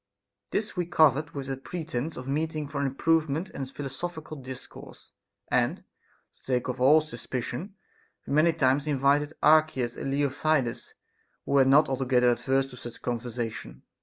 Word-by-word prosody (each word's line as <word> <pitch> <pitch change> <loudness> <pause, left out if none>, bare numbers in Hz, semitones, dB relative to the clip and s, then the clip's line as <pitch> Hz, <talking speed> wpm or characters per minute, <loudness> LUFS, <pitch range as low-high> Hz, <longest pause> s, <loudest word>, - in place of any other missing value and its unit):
This 210 0 -2
we 175 -2 -1
covered 150 -2 +3
with 135 -2 -5
a 135 - -2
pretence 155 0 -5
of 125 - -7
meeting 155 +1 -2
for 140 -1 -3
improvement 160 +4 +1
and 135 -1 -5
philosophical 155 +4 -6
discourse, 130 -2 -11 0.4
and, - - +1 0.5
to - - -33
take 125 -2 -1
off 125 0 -3
all 145 +5 +6
suspicion, 130 - -5 0.5
we - - -4
many 155 +3 +5
times 140 -1 +2
invited 145 +1 +2
Archias 155 -6 +4
and - - -4
Leontidas, 140 -2 0 0.5
who - - -5
were 140 -1 +5
not 140 +4 +6
altogether 125 -2 +2
averse 135 +2 +1
to 125 - -11
such 120 -1 -10
con 120 -1 -1
versation. 115 - -6
140 Hz, 150 wpm, -27 LUFS, 130-155 Hz, 0.5 s, all